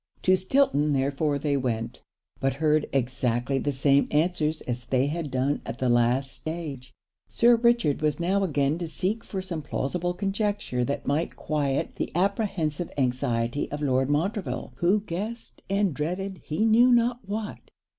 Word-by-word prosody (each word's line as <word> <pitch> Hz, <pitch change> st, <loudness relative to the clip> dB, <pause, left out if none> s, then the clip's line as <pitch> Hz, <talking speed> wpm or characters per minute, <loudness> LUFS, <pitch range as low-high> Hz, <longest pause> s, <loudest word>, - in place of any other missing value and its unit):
To 185 Hz, -, +5 dB
Stilton 185 Hz, -, +2 dB
therefore 140 Hz, +2 st, +1 dB
they 145 Hz, 0 st, 0 dB
went, 115 Hz, -4 st, -2 dB, 0.4 s
but 135 Hz, 0 st, 0 dB
heard 155 Hz, +1 st, +2 dB
exactly 125 Hz, 0 st, 0 dB
the 145 Hz, -, -1 dB
same 140 Hz, +1 st, +3 dB
answers 155 Hz, 0 st, +1 dB
as 120 Hz, -1 st, -4 dB
they 130 Hz, 0 st, +2 dB
had 155 Hz, +1 st, -3 dB
done 130 Hz, +2 st, 0 dB
at -, -, -6 dB
the 130 Hz, -1 st, 0 dB
last 120 Hz, +3 st, +2 dB
stage. 155 Hz, -6 st, -6 dB, 0.4 s
Sir 240 Hz, +1 st, +5 dB
Richard 235 Hz, -, +2 dB
was 150 Hz, -2 st, +1 dB
now 190 Hz, +4 st, +1 dB
again 150 Hz, -2 st, +1 dB
to 170 Hz, -, -3 dB
seek 195 Hz, +7 st, -2 dB
for 190 Hz, -2 st, -5 dB
some 175 Hz, -4 st, -4 dB
plausible 175 Hz, +6 st, -2 dB
conjecture 200 Hz, -, -1 dB
that 140 Hz, -, -3 dB
might 150 Hz, +4 st, -1 dB
quiet 145 Hz, -3 st, -1 dB
the -, -, -2 dB
apprehensive 180 Hz, -4 st, 0 dB
anxiety 125 Hz, -1 st, 0 dB
of 145 Hz, +1 st, -4 dB
Lord 130 Hz, -1 st, +2 dB
Montreville, 185 Hz, +7 st, -1 dB
who 190 Hz, +5 st, +3 dB
guessed 210 Hz, +5 st, -6 dB
and 195 Hz, -3 st, +1 dB
dreaded 180 Hz, +6 st, -3 dB
he 180 Hz, +9 st, 0 dB
knew 235 Hz, +3 st, +6 dB
not 240 Hz, 0 st, +3 dB
what. 210 Hz, 0 st, -5 dB
150 Hz, 155 wpm, -26 LUFS, 135-195 Hz, 0.4 s, knew